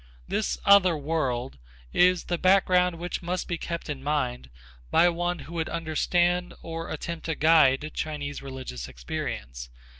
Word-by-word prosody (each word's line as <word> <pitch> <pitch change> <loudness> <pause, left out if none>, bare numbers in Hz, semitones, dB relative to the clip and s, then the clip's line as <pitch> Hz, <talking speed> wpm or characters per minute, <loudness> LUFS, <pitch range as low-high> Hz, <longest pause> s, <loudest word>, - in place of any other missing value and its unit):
This 215 - -1
other 190 -4 +6
world 135 - -2 0.3
is 180 0 +4
the 175 -1 -2
background 180 -2 +4
which 175 +1 -4
must 180 +1 -3
be 170 -2 -3
kept 170 -1 -5
in 145 -3 -4
mind 130 - -1 0.4
by 175 - +5
one 175 +1 -1
who 165 - -10
would 165 -1 -2
understand 175 +2 0
or 165 0 -5
attempt 165 +2 -5
to 160 - -1
guide 155 -2 +4
Chinese 145 -2 -4
religious 130 - -7
experience. - - -6
165 Hz, 145 wpm, -26 LUFS, 140-175 Hz, 0.4 s, other